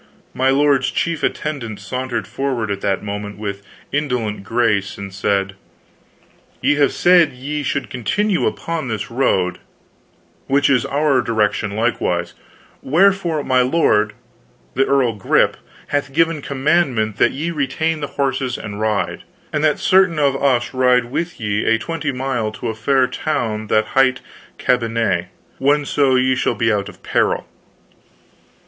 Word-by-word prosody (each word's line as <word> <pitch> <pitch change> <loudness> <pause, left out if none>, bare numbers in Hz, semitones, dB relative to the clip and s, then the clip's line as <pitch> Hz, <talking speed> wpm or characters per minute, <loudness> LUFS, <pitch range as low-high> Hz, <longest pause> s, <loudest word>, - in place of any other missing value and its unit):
My 130 +1 +1
lord's 140 0 +3
chief 170 -2 -1
attendant 130 -9 -3
sauntered 120 +1 -3
forward 130 -6 -2
at 100 0 -3
that 100 0 -1
moment 105 0 -5
with 100 -1 -5 0.3
indolent 125 -8 -2
grace, 110 -3 0
and 100 -1 -7
said: 100 0 0 1.1
"Ye - - +3
have 145 -1 +3
said 175 -4 +4
ye 145 +4 -4
should 140 0 -3
continue 190 - 0
upon 165 -5 -3
this 110 -1 -4
road, 95 -8 +1 0.9
which 140 +1 +3
is 125 -4 +2
our 140 -2 +2
direction 105 -2 0
likewise; 90 -6 -1 0.5
wherefore 170 0 +2
my 130 -2 +3
lord, 125 -6 +2 0.6
the 135 +2 +2
earl 135 -4 +2
Grip, 100 -3 +2 0.3
hath 140 -1 -1
given 165 0 +2
commandment 135 -6 0
that 120 - +3
ye 160 +5 -3
retain 160 +2 -1
the 145 - -3
horses 135 -2 0
and 105 -1 -7
ride, 110 -2 -1 0.3
and 150 0 0
that 150 -2 +3
certain 185 -3 +3
of 140 -2 +2
us 135 -3 +1
ride 125 -2 +2
with 170 +4 -3
ye 105 -1 -1
a 115 - +3
twenty 155 +3 -3
mile 125 -4 -2
to 120 - -4
a - - -2
fair 130 +4 +2
town 110 -7 -2
that 110 +1 +1
hight 130 -1 +3 0.4
Cambenet, 115 -7 0 0.3
whenso 140 -1 +2
ye 130 0 +3
shall 130 -2 0
be 115 0 +1
out 100 -1 -2
of - - -16
peril." - - 0
130 Hz, 145 wpm, -19 LUFS, 110-145 Hz, 1.1 s, said